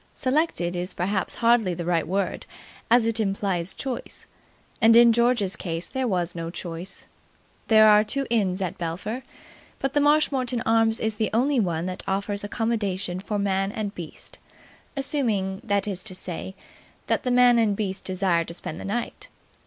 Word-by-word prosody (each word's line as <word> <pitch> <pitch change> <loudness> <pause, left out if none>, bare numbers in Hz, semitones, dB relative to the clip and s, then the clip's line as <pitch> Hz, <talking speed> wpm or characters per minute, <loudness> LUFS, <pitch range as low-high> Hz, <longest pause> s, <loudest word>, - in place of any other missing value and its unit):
Selected 255 - 0
is 180 +1 -3
perhaps 190 +1 -1
hardly 230 -6 +4
the 170 0 -5
right 170 -2 +1
word, 195 +2 -2 0.4
as 235 0 +5
it 230 0 +1
implies 195 -4 -1
choice, 265 -3 -6 0.6
and 225 0 +7
in 235 0 +8
George's 235 -5 +2
case 165 -1 -3
there 260 -1 -2
was 180 -4 -1
no 165 -1 -5
choice. 175 +2 -7 0.6
There 215 -1 +7
are 210 0 +7
two 275 +5 -2
inns 195 -5 +1
at 185 -3 -3
Belpher, 180 +9 -4 0.6
but 270 0 -2
the 290 - +3
Marshmoreton 275 -5 +2
Arms 225 0 +3
is 220 -1 -1
the 220 -1 0
only 265 +3 +2
one 170 -5 0
that 185 0 -4
offers 200 +1 -1
accommodation 205 -5 -2
for 205 +2 -3
man 195 -1 0
and 210 -2 -4
beast, 170 -5 -8 0.6
assuming 220 -9 -1
that 200 -3 0
is 190 -3 -4
to 190 -4 -7
say 185 +1 -5 0.5
that - - +1
the 255 - -2
man 245 -1 +5
and 215 -3 +2
beast 195 -2 -3
desire 185 -2 +1
to 170 - -8
spend 165 -1 -6
the - - -7
night. 230 +4 -4
205 Hz, 170 wpm, -25 LUFS, 185-235 Hz, 0.6 s, in